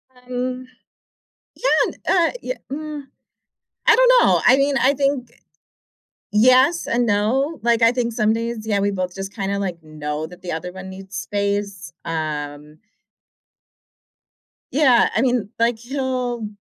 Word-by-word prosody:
Um, 250 0 -5 0.9
yeah, - - -1 0.2
n - - -6
uh, 345 -3 +3
ye - - -3 0.2
mm, 300 0 -5 0.8
I - - +8
don't - - +5
know. - - +4
I 255 - +7
mean, 275 0 +2
I 270 +1 +3
think, 275 -3 -1 1.0
yes 255 +9 +4
and 240 +1 +1
no. 245 +9 +1
Like, 235 0 +2
I 230 +1 +6
think 240 -1 -1
some 220 -1 +2
days, 230 -1 -3
yeah, 205 -2 +1
we 200 +1 +1
both 185 -2 -3
just 195 0 -6
kinda, 200 -1 -2
like, 180 -4 -4
know 155 0 -5
that 180 +2 -14
the 180 - -5
other 180 +3 -5
one 190 0 -9
needs 190 +1 -9
space. 200 -2 -3
Um 150 -2 -5 1.9
Yeah, 260 -4 +4
I - - +3
mean, 245 -5 0
like, 230 0 +1
he'll 250 -2 -3
230 Hz, 145 wpm, -21 LUFS, 190-255 Hz, 1.9 s, I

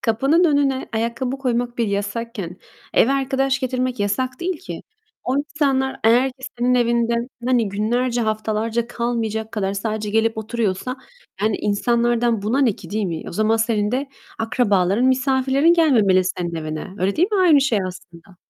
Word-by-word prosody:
kapının 270 +10 +2
önüne 285 -4 +2
ayakkabı 235 +4 -2
koymak 245 -2 -1
bir 230 - +1
yasakken 205 -2 -4 0.4
eve 260 - +4
arkadaş 270 0 0
getirmek 255 -2 -2
yasak 255 +6 -1
değil 350 -1 -2
ki. - - -7 0.4
O 255 - +1
insanlar 280 -2 0
eğer 245 +4 +5
ki 260 0 -23 0.2
senin 250 +1 +2
evinde, 235 -1 +2 0.3
hani, 245 -4 +2
günlerce, 235 +5 0
haftalarca 220 +1 -1
kalmayacak 230 -2 -3
kadar 195 -3 -1
sadece 215 0 -3
gelip 225 +1 +1
oturuyorsa, 220 +2 -2 0.5
yani, 215 -1 +2
insanlardan 235 +1 +1
buna 225 +6 0
ne 260 -5 +3
ki, - - -12
değil 215 +1 -1
mi? 165 -3 -4
O - - -8
zaman 215 +4 +2
senin 220 -2 0
de 270 +3 -2 0.3
akrabaların, 210 -2 +1
misafirlerin 265 +4 +3
gelmemeli 220 - +4
senin 175 -2 -3
evine. 155 -1 -4
Öyle 190 +2 0
değil 355 +5 +3
mi? 410 - +2
Aynı 325 -6 +6
şey 265 -6 +2
aslında. 180 0 -13
235 Hz, 155 wpm, -21 LUFS, 215-260 Hz, 0.5 s, Aynı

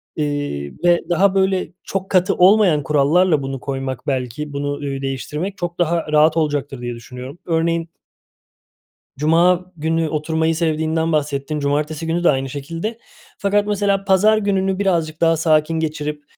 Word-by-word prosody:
eee, 145 - -3
ve 175 -1 +4
daha, 190 +3 +3
böyle, 190 -1 +1
çok 195 0 -4
katı 185 -1 +3
olmayan 185 -5 +5
kurallarla 150 +2 +3
bunu 135 -1 -4
koymak 135 -1 -5
belki, 135 +2 -3
bunu, 145 0 -2
ııı, 140 -1 -4
değiştirmek 150 +8 -4
çok 175 0 -5
daha 170 -2 0
rahat 155 +2 +4
olacaktır 145 -4 -1
diye 120 -1 -4
düşünüyorum. 125 +6 -10
Örneğin 165 0 0 1.3
Cuma 175 +4 +3
günü 160 +1 0
oturmayı 160 +1 0
sevdiğinden 160 0 0
bahsettin, 150 0 -1
cumartesi 150 +3 -1
günü 170 +2 -1
de - - +5
aynı 135 -1 0
şekilde. 165 - -5 0.4
Fakat 205 +1 +1
mesela 200 -1 +1
pazar 205 +3 +4
gününü 195 -2 0
birazcık 170 -5 0
daha 165 -1 +4
sakin 155 0 +2
geçirip, 150 -2 -3
160 Hz, 145 wpm, -20 LUFS, 145-180 Hz, 1.3 s, olmayan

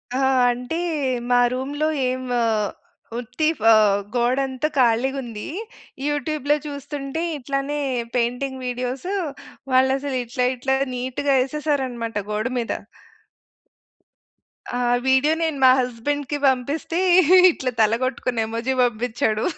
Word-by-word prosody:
ఆహ్, 265 0 +2 0.2
అంటే 250 +6 -4 0.5
మా 245 0 +4
రూమ్‌లో 285 +4 -2 0.2
ఏం 255 - -2
వ - - +1 0.8
ఉత్తి 250 +6 -2
ఫ - - -19 0.5
గోడంతా 260 +3 +1
ఖాళీగుంది. 240 -2 +1 0.6
యూట్యూబ్‌లో 295 0 0
చూస్తుంటే 285 +1 -5 0.2
ఇట్లనే 275 +2 -2 0.4
పెయింటింగ్ 250 +2 -1
వీడియోసు 250 +8 -3 0.6
వాళ్ళసలు 265 +1 +2
ఇట్లా 250 +2 -1
ఇట్లా 265 +2 0 0.2
నీట్‌గా 260 +3 0
యేసేసారనమాట 255 -6 -2
గోడ 215 +3 -1
మీద. 230 - -3 2.0
ఆ - - -1 0.3
వీడియో 265 +4 +4
నేను 320 -3 0
మా 260 - +9
హస్బెండ్‌కి 265 +4 -2
పంపిస్తే, 280 +6 0 0.5
ఇట్లా 260 -5 -3
తల 215 0 +4
గొట్టుకొన్న 245 -3 -1
ఎమోజి 230 +4 -2
బంపిచ్చాడు. 230 -2 0
260 Hz, 100 wpm, -22 LUFS, 245-280 Hz, 2.0 s, మా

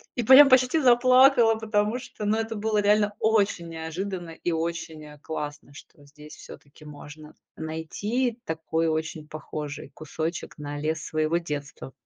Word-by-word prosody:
и 240 - -1
прям 270 +4 +8
почти 255 +4 +4
заплакала, 255 -1 +5
потому 215 0 -1
что, 250 -4 -8
ну, 210 +1 +2
это 225 0 -3
было 215 0 0
реально 210 0 +2
очень 200 -6 +1
неожиданно 170 +2 -5
и 170 +1 -4
очень, 160 -1 -4
э, 150 0 -14
классно, 150 -2 -7
что 145 0 -16
здесь 150 +1 -14
всё-таки 145 +2 -14
можно 150 +1 -12 0.2
найти 160 +11 -2
и 235 +1 -13
такой 160 -1 -2
очень 155 -1 -3
похожий 150 -1 -7
кусочек 160 +3 -5
на 145 -1 -6
лес 155 +1 -3
своего 155 +2 0
детства. 145 -5 -6
165 Hz, 150 wpm, -25 LUFS, 155-220 Hz, 0.2 s, прям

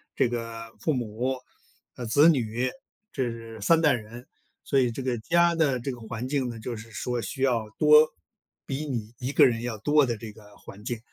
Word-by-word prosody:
这 - - +2
个 115 -1 -5
父 155 - 0
母， 125 +1 -2 0.6
呃， 120 - -6
子 145 +8 +6
女， 125 -4 +1 0.4
这 115 -4 -4
3 165 +10 +4
代 150 -3 +5
人。 120 +1 -7 0.4
所 140 - +3
以 125 -2 +3
这 130 +3 -5
个 130 -2 0
家 170 +7 +3
的 145 -6 +1
这 135 +3 -3
个 120 - -8
环 115 +2 -5
境 135 -3 -1
呢， 115 -1 -7
就 120 +2 -5
是 115 +1 -10
说 120 +1 -3
需 135 - -4
要 115 -5 +1
多 150 0 +7 0.6
比 145 +3 -4
你 115 -4 -4
1 130 +2 -3
个 - - +6
人 115 -3 +1
要 120 -2 -4
多 145 +5 +3
的 120 -2 -2
这 110 -1 -8
个 105 -1 -17
环 105 +2 -13
境， 120 -1 -3
120 Hz, 205 characters per minute, -26 LUFS, 115-135 Hz, 0.6 s, 多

